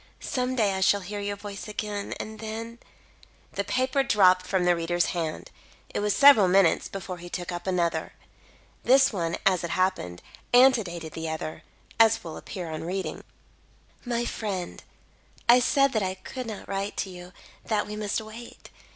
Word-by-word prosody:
Some 255 0 -2
day 210 -5 +2
I 190 - -2
shall 200 +1 +4
hear 205 +3 -5
your 205 0 -3
voice 200 0 -8
again, 210 -1 -4
and 220 0 -7
then 225 +2 -6 0.4
" - - -29
The - - -1
paper 260 +2 +1
dropped 185 -7 +4
from 185 -2 +1
the 175 0 +4
reader's 175 +1 0
hand. 165 -3 -4 0.4
It - - -1
was 205 0 +1
several 275 -9 +8
minutes 185 -2 +3
before 185 -2 -6
he 175 +1 -9
took 175 0 -4
up 175 +2 -6
another. 175 -2 0 0.7
This 270 +1 +5
one, 170 -3 -1
as 185 -3 +3
it 170 - -3
happened, 175 - -1 0.3
antedated 205 -11 +4
the 160 0 -4
other, 155 0 -5 0.4
as 225 0 +5
will 165 - -7
appear 180 -4 -7
on 155 - -5
reading 185 +3 -3
it: - - -17 0.8
"My 240 -1 -1
friend: 195 -7 -4 0.6
"I 240 +1 +8
said 275 +2 +3
that 220 - +1
I 185 -1 -2
could 250 +6 -7
not 215 -3 -7
write 195 +1 -3
to 190 - -2
you 180 0 -10 0.3
that 215 -2 0
we 210 - -6
must 210 0 -1
wait. 220 +2 -11
200 Hz, 175 wpm, -26 LUFS, 180-225 Hz, 0.8 s, several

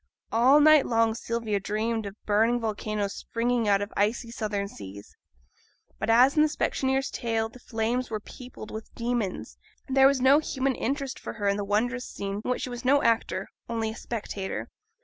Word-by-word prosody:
All 255 +6 +6
night 305 -1 +6
long 230 -1 +2
Sylvia 230 -2 -2
dreamed 215 +2 -2
of 200 - -8
burning 225 +4 +3
volcanoes 215 -2 -2
springing 235 -1 -1
out 200 0 +3
of 205 - -8
icy 230 +3 0
southern 210 -3 -2
seas. 100 - -11 0.8
But, - - -2
as 250 +4 +6
in 305 - +5
the 310 - +5
specksioneer's 270 -2 0
tale 225 -1 -1
the 250 - -15
flames 240 +1 -2
were 215 -1 -2
peopled 245 0 -11
with 220 0 -8
demons, 235 -5 -3 0.3
there 270 0 +6
was 275 -1 +2
no 265 +3 +6
human 270 -3 -1
interest 275 +1 -3
for - - -6
her 205 -3 -2
in 200 0 +2
the 205 - -2
wondrous 240 +5 0
scene 200 +1 -4
in - - -4
which 250 - -1
she - - -3
was 245 0 -6
no 280 +3 +4
actor, 230 -1 +1 0.2
only 225 -1 -1
a - - -9
spectator. 205 -4 -5
230 Hz, 185 wpm, -27 LUFS, 210-250 Hz, 0.8 s, All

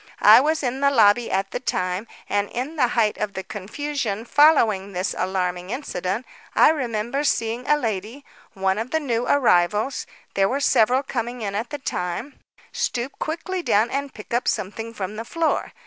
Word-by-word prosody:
I - - +9
was 310 +2 0
in 255 +1 -1
the 280 - +5
lobby 230 -2 +4
at 195 0 -1
the - - -3
time, 185 -3 -2 0.2
and 205 0 0
in 265 +7 -4
the 265 -5 +3
height 230 -3 +1
of 210 -1 -2
the 190 - -4
confusion 220 +2 -4
following 225 -10 +4
this 180 0 -1
alarming 180 -1 -2
incident, 215 -4 -3 0.3
I - - +7
remember 245 -2 -2
seeing 230 -3 -1
a 295 - +4
lady, 225 +2 -4 0.3
one 190 -1 0
of 230 +3 -3
the 320 - +1
new 245 -5 -1
arrivals 215 -1 +2 0.3
(there 195 0 +2
were 270 - 0
several 255 -1 +3
coming 240 -2 -4
in 200 -1 -3
at 215 +4 -3
the 295 - -4
time) 235 +1 -4 0.3
stoop 280 - -3
quickly 350 +4 -3
down 220 -7 +2
and 280 0 -2
pick 210 0 -10
up 240 - 0
something 225 +4 -2
from 210 -1 -5
the 225 - -4
floor. 330 +4 -1
230 Hz, 180 wpm, -23 LUFS, 200-275 Hz, 0.3 s, I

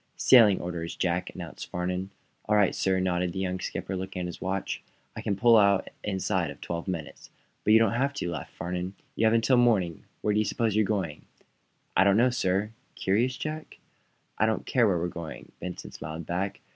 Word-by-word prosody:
"Sailing 110 -7 +7
orders, 85 -1 -4
Jack," 90 0 -1
announced - - -8
Farnum. 90 +2 -2 0.4
"All 105 - +2
right, 105 -3 +4
sir," 95 -1 +1
nodded 90 -1 0
the 95 - -4
young 95 -1 -2
skipper, 95 - -4
looking 95 0 -4
at - - -2
his 85 - -7
watch. 95 0 -2 0.3
"I - - -5
can 100 - -1
pull 115 +3 +6
out 100 -2 +3
inside 95 -2 0
of - - -9
twelve 85 +1 -5
minutes." 85 -5 -5 0.3
"But 105 - +4
you - - +9
don't 115 0 +3
have 135 +4 +1
to," - - -2
laughed 80 -6 -6
Farnum. 90 +2 -4 0.2
"You 110 - +3
have 110 - +3
until 115 +3 +4
morning. 105 -9 +2 0.2
Where 105 - +1
do 105 - +2
you - - +3
suppose 110 -2 0
you're 110 0 +4
going?" 95 -8 -2 0.7
"I - - +6
don't 100 +1 +4
know, 125 +2 +4
sir." 100 -3 0 0.2
"Curious, 120 +7 +1
Jack?" 155 0 -5 0.6
"I 110 - +4
don't 110 - -1
care 120 -4 +3
where 95 -3 +2
we're 85 +1 -1
going," 85 -2 -8
Benson 90 -1 -6
smiled 80 +1 -7
back. 95 +4 -3
95 Hz, 200 wpm, -28 LUFS, 90-110 Hz, 0.7 s, you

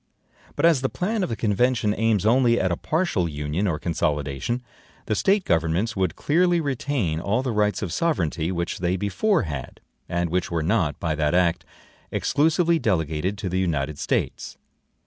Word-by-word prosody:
But - - +1
as 165 -6 +4
the 130 - 0
plan 215 +4 -2
of 185 - -1
the 115 - -2
convention 110 0 +1
aims 110 -3 +1
only 120 +1 +4
at 95 - +1
a - - +1
partial 155 - 0
union 75 +6 -2
or 80 -5 0
consolidation, 75 - -2 0.4
the - - -1
State 195 - +2
governments 85 +7 +1
would 95 -4 0
clearly 175 +3 +2
retain 135 - -1
all 105 +9 0
the 130 - -1
rights 105 -1 +1
of 90 -4 -3
sovereignty 90 - 0
which 85 -1 -3
they 90 +1 0
before 140 - +1
had, 70 -7 -6 0.3
and 85 -1 -1
which 90 +1 0
were 85 -2 -1
not, 80 -5 0
by 80 -2 -1
that 75 +2 0
act, 85 -2 +2 0.5
EXCLUSIVELY 165 +3 +2
delegated 90 - -1
to 100 - -4
the 90 +1 -1
United 75 -5 -1
States. - - -2
95 Hz, 170 wpm, -24 LUFS, 80-130 Hz, 0.5 s, as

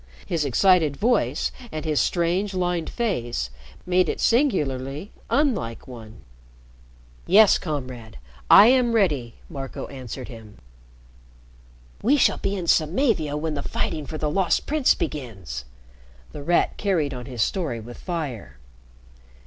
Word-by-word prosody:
His 165 -5 -1
excited 155 - +3
voice 205 - +1 0.2
and 155 0 -5
his 155 -2 +1
strange, 180 +3 0
lined 175 -2 -1
face 120 - -2 0.3
made 180 0 +2
it - - -3
singularly 150 - 0 0.2
unlike 230 - 0
one. 110 - -11 1.0
"Yes, 205 +2 +6
Comrade, 125 - -6 0.3
I 205 - +10
am 245 -1 +4
ready," 145 - +1
Marco 135 -1 -6
answered 130 -1 -7
him. 110 -4 -12 1.4
"We 270 +7 +3
shall - - +3
be 200 - -1
in 185 -3 -4
Samavia 160 - +1
when 155 +1 -2
the 145 - -3
fighting 145 +1 -3
for 155 - -5
the 150 -1 -1
Lost 185 0 +1
Prince 300 -3 +3
begins." 95 - -5 0.7
The - - -8
Rat 170 +4 +1
carried 165 -9 0
on 125 0 -7
his 125 -5 0
story 160 - -2
with 120 +2 -10
fire. 135 - -5
155 Hz, 130 wpm, -24 LUFS, 125-190 Hz, 1.4 s, I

